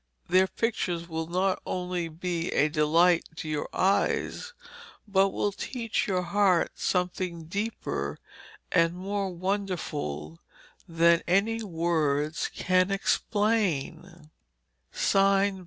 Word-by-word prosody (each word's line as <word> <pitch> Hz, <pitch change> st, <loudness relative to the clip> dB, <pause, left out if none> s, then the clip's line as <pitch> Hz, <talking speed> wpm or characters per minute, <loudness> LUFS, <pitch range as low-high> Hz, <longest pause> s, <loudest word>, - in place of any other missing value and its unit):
Their 185 Hz, +2 st, +4 dB
pictures 180 Hz, -7 st, -2 dB
will 160 Hz, -1 st, -4 dB
not 185 Hz, +2 st, 0 dB
only 180 Hz, -2 st, -3 dB
be 170 Hz, +1 st, -3 dB
a 150 Hz, -, +3 dB
delight 165 Hz, +3 st, +3 dB
to 160 Hz, -, -6 dB
your 150 Hz, -1 st, -2 dB
eyes, 200 Hz, -, 0 dB, 0.5 s
but 195 Hz, -1 st, +3 dB
will 205 Hz, -, -1 dB
teach 230 Hz, +2 st, -3 dB
your 185 Hz, -2 st, 0 dB
heart 185 Hz, -1 st, +2 dB
something 180 Hz, -2 st, -2 dB
deeper 200 Hz, +8 st, -3 dB, 0.5 s
and 165 Hz, -1 st, +3 dB
more 195 Hz, +1 st, -2 dB
wonderful 170 Hz, -, -3 dB, 0.5 s
than 170 Hz, 0 st, +4 dB
any 210 Hz, +6 st, +2 dB
words 160 Hz, -5 st, 0 dB
can 185 Hz, 0 st, +2 dB
explain. 195 Hz, -6 st, -1 dB
180 Hz, 100 wpm, -27 LUFS, 165-195 Hz, 0.5 s, Their